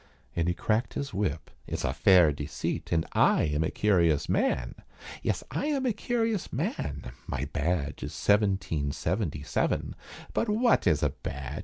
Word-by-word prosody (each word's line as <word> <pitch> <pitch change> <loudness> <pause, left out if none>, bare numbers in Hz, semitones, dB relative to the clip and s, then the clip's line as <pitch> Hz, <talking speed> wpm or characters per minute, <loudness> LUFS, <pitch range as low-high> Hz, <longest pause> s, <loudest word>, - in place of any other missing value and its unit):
And 85 0 +1
he 90 - +1
cracked 110 +5 0
his 140 -2 -3
whip. 90 -7 -2 0.2
"It's - - -3
a - - 0
fair 90 -5 +6
deceit 75 +1 -4
And 80 -1 +2
I - - +4
am 75 +1 +1
a 80 - 0
curious 85 -8 +2
man 65 -1 +1 0.5
Yes - - -1
I 290 - -1
am 280 -3 0
a 245 - +2
curious 225 -2 -1
man, 70 -3 -3 0.2
my 65 +1 -2
badge 80 -2 -1
Is - - -4
seventeen 95 -8 +1
seventy 80 -3 -2
seven, 75 - -1 0.4
But 230 - 0
wot 230 +3 +3
is 80 -4 +3
a - - +2
badge? 70 +2 -6
85 Hz, 165 wpm, -28 LUFS, 75-110 Hz, 0.5 s, fair